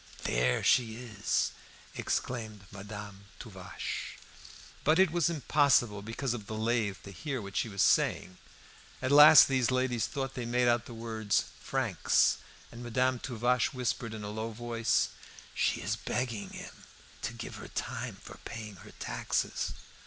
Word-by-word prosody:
there 60 +1 +1
she 115 -3 +3
is!" 110 -4 -1 0.4
exclaimed 110 -5 -3
Madame 100 0 -9
Tuvache. 95 -5 -6 0.7
But 155 +2 +4
it 190 -3 +5
was 170 -1 +2
impossible 140 -9 +3
because 115 +4 -3
of 110 -4 -7
the 110 - -5
lathe 110 -3 0
to 100 - -9
hear 130 +9 -4
what 100 -2 -8
she 115 - 0
was 100 -2 +1
saying. 90 0 +2 0.6
At 130 - -1
last 150 +2 +10
these 130 -3 +2
ladies 130 -3 +1
thought 135 -2 -4
they 120 -2 -4
made 125 +1 +2
out 120 -1 +2
the 120 - -9
word 110 -2 -6
"francs," - - +2 0.3
and 120 - -10
Madame 125 +1 +1
Tuvache 125 +1 0
whispered 120 -2 -2
in 105 - -7
a 105 - -5
low 110 +1 -3
voice 115 0 0 0.4
"She - - +1
is - - -1
begging 110 -5 -3
him - - -10 0.4
to - - -3
give - - -7
her - - -9
time - - -4
for - - -11
paying 110 -3 -7
her - - -13
taxes." - - -2
115 Hz, 150 wpm, -31 LUFS, 105-125 Hz, 0.7 s, last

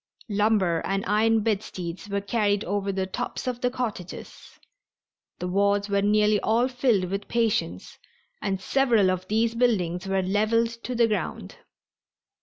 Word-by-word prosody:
Lumber 200 -5 +2
and 195 0 -1
iron 220 +2 +3
bedsteads 195 -3 -3
were 200 0 -1
carried 205 -1 0
over 200 +1 -1
the 190 -1 -1
tops 190 - -4
of 250 -1 -3
the 250 - +2
cottages. 235 -8 -6 0.8
The 180 - -4
wards 200 +2 +1
were 200 0 +2
nearly 210 +1 +3
all 230 +5 +2
filled 250 -7 +1
with 200 +1 -3
patients, 210 - -1 0.4
and 195 -2 -1
several 230 -4 +3
of 185 0 -4
these 225 +2 +1
buildings 195 -7 0
were 195 0 +1
leveled 215 +4 +2 0.2
to 250 - -3
the 235 0 +4
ground. 185 - -4
205 Hz, 145 wpm, -25 LUFS, 190-225 Hz, 0.8 s, the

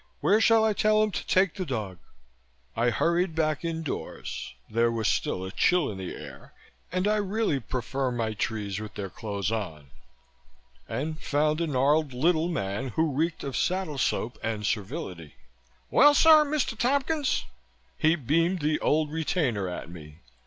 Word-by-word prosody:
Where 215 +2 +3
shall 225 -1 +5
I 220 - +2
tell 215 +1 +3
him 215 - 0
to - - -5
take 185 -2 +3
the 190 - -4
dog?" 110 - -4 0.8
I 120 +2 +2
hurried 170 - +1
back 155 -2 0
indoors 160 - -5
there 115 +1 +2
was 115 -2 -1
still 95 - 0
a 95 - -6
chill 175 - +2
in 95 - -7
the 95 - -5
air - - -11 0.4
and 185 +2 0
I 215 0 +2
really 205 -6 0
prefer 130 +2 -2
my 115 -2 -2
trees 105 -2 -3
with 110 -1 -8
their 100 -3 -5
clothes 100 -2 -3
on 80 -11 -5 1.0
and 155 +3 -3
found 150 +2 +1
a 170 - 0
gnarled 145 +1 +2
little 160 +5 +2
man 100 - -2
who 160 -2 +2
reeked 160 +4 -1
of 135 -2 -4
saddle 180 -6 -1
soap 120 -1 -1
and 110 -2 -3
servility. 100 - -4 0.6
"Well, 290 +3 +6
sir, 310 0 +7
Mr. 290 -5 -1
Tompkins," 275 - 0 0.5
he 160 +2 +3
beamed 165 +5 +1
the 150 +1 +1
Old 155 0 +1
Retainer 150 - -1
at 90 - -6
me. 75 -3 -11
150 Hz, 160 wpm, -27 LUFS, 110-180 Hz, 1.0 s, sir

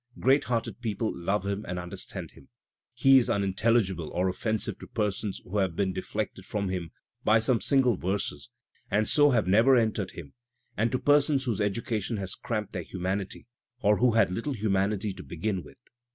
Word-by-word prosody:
\ - - -16
Great 135 +2 +3
hearted 115 +1 -2
people 110 -1 -2
love 95 +3 -1
him 100 +1 -2
and 90 - -3
understand 90 0 -6
him. 70 - -18 0.5
He 135 0 +6
is 120 - -1
•imintelligible 100 -3 +1
or 90 +1 0
oflFensive 110 +3 -2
to - - -10
persons 105 -2 -2
who 100 +3 -2
have 95 -4 0
been 95 0 0
deflected 95 +1 -4
from 100 0 -3
him 90 -3 -3 0.3
by 110 +1 +5
some 115 +1 +1
single 130 -6 +3
verses 90 -9 -3 0.4
and 105 +2 +1
so 145 -1 +5
have 115 -7 +2
never 115 +8 +5
entered 110 -5 +1
him, 75 -5 -10 0.4
and 115 +2 +1
to 130 - +1
persons 145 0 +3
whose 110 -4 -1
education 110 +1 -1
has 95 -2 -4
cramped 115 -4 -4
their 90 - -3
humanity 95 +4 -4 0.4
or 105 0 +4
who 125 -2 +3
had 105 -5 +3
little 115 +10 -2
humanity 100 -2 0
to 95 - -9
begin 95 +3 -3
with. - - -15
105 Hz, 180 wpm, -28 LUFS, 95-115 Hz, 0.5 s, He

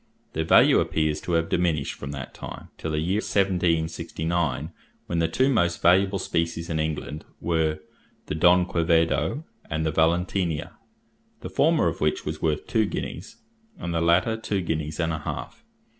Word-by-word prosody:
Their 80 - -1
value - - +6
appears 75 -1 0
to 90 - -3
have 80 0 +2
diminished 85 -6 0
from 70 - -8
that 70 -2 -6
time - - -9
till 80 - -3
the 75 - -1
year 85 +6 0
1769, 85 -5 0 0.3
when 85 - -1
the 85 - +2
two 130 +11 +2
most 85 -10 +2
valuable 95 +3 +4
species 85 -2 -2
in 80 - -1
England 75 -1 -3 0.2
were 80 -2 0 0.5
the - - -4
Don 90 +3 +5
Quevedo 85 - +1 0.3
and 80 0 -1
the 80 - +1
Valentinier, 85 0 0 0.7
the - - -7
former - - +3
of - - -3
which 75 0 0
was 75 +1 -4
worth 75 -2 0
two 110 -2 +1
guineas 90 - -5 0.4
and 85 - -4
the 85 - 0
latter 85 +7 +3
two 105 -3 -2
guineas 80 -2 -3
and 80 -1 0
a 80 - -3
half. 75 - -6
85 Hz, 165 wpm, -25 LUFS, 80-90 Hz, 0.7 s, value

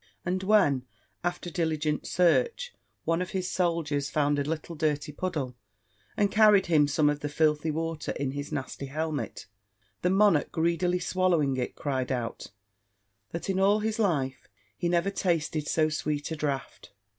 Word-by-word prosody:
And 185 +2 0
when, 185 -11 +3 0.4
after 175 0 -3
diligent 155 -3 -1
search, 465 - +2 0.3
one 165 +2 +1
of 180 - -3
his 185 -1 -2
soldiers 160 -6 0
found 145 -1 +1
a - - +1
little 160 +3 -4
dirty 150 -1 -1
puddle, 150 -6 -3 0.6
and 205 -1 +2
carried 210 -3 +6
him 155 -4 +4
some 150 +1 +2
of 145 0 +1
the 145 - -3
filthy 150 +1 +1
water 165 0 -2
in 140 -2 -2
his 145 +1 -5
nasty 135 +1 -4
helmet, 155 -2 -3 0.6
the - - +2
monarch 195 -5 +4
greedily 170 +2 +1
swallowing 175 -7 +1
it, 125 - -3
cried 130 -2 -2
out, 120 -3 -3 0.8
that 170 - -5
in 190 -1 0
all 200 +2 +4
his 220 +1 -1
life 140 - 0 0.3
he 175 - -1
never 175 +3 +1
tasted 160 -5 -1
so 155 -1 +2
sweet 150 -1 -2
a - - -1
draught! 145 -3 -4
160 Hz, 155 wpm, -28 LUFS, 145-180 Hz, 0.8 s, carried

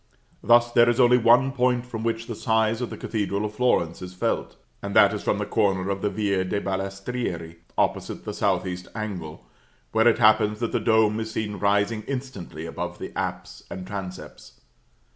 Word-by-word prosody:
Thus 120 0 +4
there 120 0 +5
is 120 +1 +1
only 125 0 +6
one 125 +4 +5
point 125 -2 +1
from 115 -3 -6
which 115 0 -1
the 115 - -5
size 110 +1 +1
of 125 - -2
the - - -7
Cathedral 105 -1 -2
of 105 - -5
Florence 105 -9 +1
is 90 0 -8
felt; - - -2 0.3
and 100 0 -5
that 100 0 +6
is 105 - -4
from - - 0
the 105 - -2
corner 100 -3 +1
of 100 0 -3
the 105 - +1
Via 100 -3 0
de' 100 +2 -1
Balestrieri, 95 -3 -4 0.2
opposite - - -1
the - - -4
south - - 0
east 90 0 -5
angle, 90 - -6 0.5
where 110 +1 +3
it 115 - +4
happens 105 -1 +4
that 115 -1 -2
the - - +1
dome 110 -1 +3
is 110 0 -4
seen 105 -2 -3
rising 100 +2 +1
instantly 125 - -6
above 85 +1 -5
the - - -7
apse 65 -1 -4
and 95 -1 -7
transepts. 90 -11 -8
105 Hz, 190 wpm, -25 LUFS, 95-115 Hz, 0.5 s, only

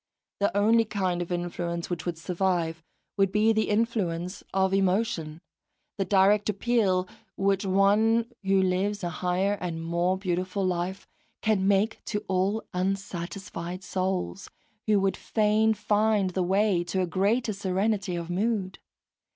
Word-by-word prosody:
The 200 0 +1
only 225 +3 +4
kind 190 -5 -1
of 175 - -5
influence 175 -1 -3
which 175 0 -3
would 170 -2 -2
survive 170 -2 -1 0.4
would 195 -1 +3
be 215 +2 +3
the 220 0 0
influence 200 -5 -1
of 190 0 +1
emotion, 185 -5 0 0.6
the 195 - +1
direct 200 +2 +3
appeal 200 -4 +1 0.3
which 195 0 +1
one 210 +4 +3 0.2
who 195 0 +3
lives 190 +2 0
a 175 - -2
higher 185 +4 0
and 170 -3 -3
more 170 +3 0
beautiful 185 +1 -2
life 180 +1 -2 0.4
can 205 -3 +2
make 205 +2 +1
to 210 -2 -3
all 195 +3 0
unsatisfied 185 -1 -4
souls, 185 - -2 0.4
who 210 -2 +4
would 195 0 +1
fain 215 0 +2
find 210 -2 +1
the 185 - -1
way 190 0 +2
to 185 +2 -1
a - - +1
greater 205 +7 +1
serenity 195 0 -1
of 170 -1 -4
mood. 190 +1 -1
190 Hz, 140 wpm, -27 LUFS, 180-205 Hz, 0.6 s, only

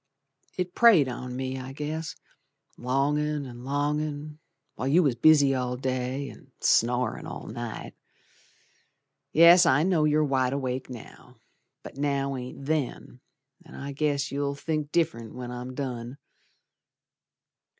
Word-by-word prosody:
It 180 -1 -2
preyed 215 - +6
on 125 0 -5
me, 130 0 -3
I 130 +1 -7
guess, 155 +3 -4 0.6
Longin' 145 +3 0
and 120 -1 -10
longin' 150 +2 -2 0.3
While 130 - -4
you 165 +6 +4
was 140 -5 +2
busy 140 +2 +5
all 125 -1 -2
day, 130 +1 -2
and - - -13
snorin' 125 +2 +2
all - - -7
night. 120 0 -6 1.4
Yes, 170 +2 +8
I 145 -1 +4
know 170 -4 +2
you're 150 0 +3
wide 130 -3 +1
awake 130 -2 -3
now, 120 -3 -11 0.5
But - - -10
now 140 -1 0
ain't 130 +2 -7
then, 145 -4 -2 0.4
An' 165 - -14
I 140 +1 -6
guess 145 -1 -1
you'll 140 0 -1
think 150 0 -3
diff'rent 150 -10 -1
When 125 -1 -6
I'm 125 +1 -6
done. 125 -2 -5
140 Hz, 130 wpm, -27 LUFS, 125-150 Hz, 1.4 s, Yes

